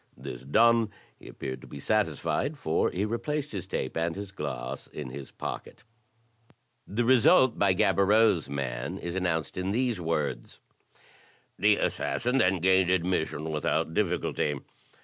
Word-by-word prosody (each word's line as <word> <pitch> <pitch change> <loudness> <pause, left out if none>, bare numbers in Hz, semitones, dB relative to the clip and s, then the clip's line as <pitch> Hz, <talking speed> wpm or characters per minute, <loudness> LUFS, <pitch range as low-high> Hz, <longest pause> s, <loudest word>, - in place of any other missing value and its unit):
This - - -7
done, 115 - +4 0.3
he - - -14
appeared 65 - -6
to - - -12
be - - -9
satisfied, 105 - 0
for 80 - +1
he 95 +3 -1
replaced 150 +7 -2
his 95 -3 -4
tape - - -3
and 85 0 -1
his 100 -1 -6
glass 60 -9 -5
in 70 -4 -7
his 70 0 -8
pocket. - - -7 1.0
The 115 +4 -1
result 130 0 +5
by 100 -2 +4
Gaboriau's 100 -2 +3
man 70 +4 -3
is 85 -3 -5
announced 90 -3 -1
in 95 +1 -1
these 120 -5 0
words: 75 -7 -2 0.5
" - - -30
The - - +5
assassin 125 +3 0
then 95 -5 +2
gained 95 0 +4
admission 85 -4 0
without 75 +1 0
difficulty. 90 -6 0
90 Hz, 145 wpm, -28 LUFS, 75-110 Hz, 1.0 s, result